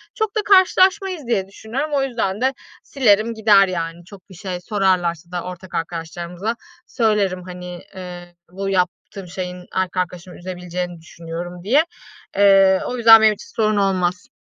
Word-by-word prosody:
Çok 440 -3 -2
da - - +2
karşılaşmayız 375 - +3
diye 195 -5 0
düşünüyorum. 230 +9 -4
O 280 - +2
yüzden 230 -6 -2
de 265 +1 +2 0.3
silerim 230 -4 +2
gider 210 -3 +5
yani. 170 -1 -4
Çok 190 0 -15
bir 190 - -13
şey 180 0 -5
sorarlarsa 180 -4 0
da 175 -1 -3
ortak 180 0 -8
arkadaşlarımıza 170 +5 -4 0.3
söylerim, 205 -6 0
hani, 180 -1 -8
eee, 175 -1 -9 0.2
bu 195 +2 -4
yaptığım 185 +1 -2
şeyin 180 0 -6
erkek 185 -1 -1
arkadaşımı 180 0 -4
üzebileceğini 180 -1 -5
düşünüyorum 170 +2 -8
diye. 265 +10 +4 0.5
Eee, 195 -1 +5
o 250 - -3
yüzden 225 -1 +8
benim 220 -1 +5
için 205 - -14
sorun 215 -1 +1
olmaz. 185 -2 0
190 Hz, 150 wpm, -20 LUFS, 180-220 Hz, 0.5 s, yüzden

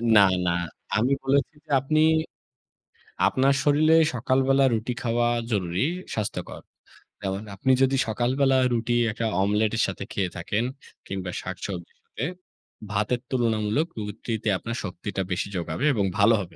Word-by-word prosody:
না, 100 - +9 0.3
না। - - +3 0.5
আমি 125 +5 +2
বলেছি 140 +3 +1
যে - - -30
আপনি, 155 +3 +2 1.3
আপনার 135 +1 +3
শরীরে 155 +2 +4 0.2
সকালবেলা 135 +3 +3
রুটি 115 +2 -1
খাওয়া 120 0 +1 0.2
জরুরী, 95 +2 0 0.3
স্বাস্থ্যকর। 105 -2 -4 0.7
এবং 95 +1 -2
আপনি 130 +7 +1
যদি 135 0 +4
সকালবেলা 130 +4 +2 0.2
রুটি 120 +1 0 0.2
একটা 115 +2 -3 0.2
অমলেটের 105 +3 +2
সাথে 95 0 -5
খেয়ে 95 -3 0
থাকেন, 100 +6 -1 0.4
কিংবা 95 -2 -4
শাকসবজির 90 -1 -6
সাথে 125 - -5 0.7
ভাতের 105 +4 0
তুলনামূলক 115 +4 +1
রুটিতে 110 +1 -3
আপনার 115 +5 -5
শক্তিটা 95 +1 -4
বেশি 90 +3 -1
জোগাবে 85 - -2
এবং 100 -4 +1
ভালো 115 +3 +6
হবে 85 -3 -9
110 Hz, 130 wpm, -25 LUFS, 100-130 Hz, 1.3 s, না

